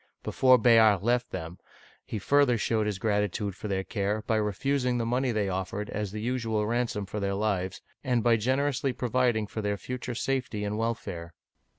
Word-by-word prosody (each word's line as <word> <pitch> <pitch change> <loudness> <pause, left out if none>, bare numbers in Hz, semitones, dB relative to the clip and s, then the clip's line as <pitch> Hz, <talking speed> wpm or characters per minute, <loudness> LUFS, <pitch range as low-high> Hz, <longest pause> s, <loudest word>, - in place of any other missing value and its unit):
Before 130 -1 +5
Bayard 110 -5 +5
left 120 +1 +1
them, 85 -1 -6 0.4
he - - -5
further 140 +3 +3
showed 110 0 0
his 105 -3 -2
gratitude 105 -1 -1
for 105 - -6
their 95 -1 -1
care 105 +2 -2
by 110 - +1
refusing 125 +5 0
the 115 - -1
money 125 +2 +1
they 105 -3 0
offered 95 +2 -3
as 105 -2 -3
the 105 - -5
usual 115 -3 -1
ransom 115 -2 -1
for 105 +2 -5
their 100 -1 -1
lives, 95 -3 -1 0.2
and 125 -4 +1
by 120 -1 +5
generously 130 +3 0
providing 120 -3 +1
for 110 +2 -5
their 105 -1 -1
future 125 +2 -5
safety 125 -5 -2
and 105 +1 -2
welfare. 85 -7 -4
110 Hz, 180 wpm, -28 LUFS, 100-125 Hz, 0.4 s, Before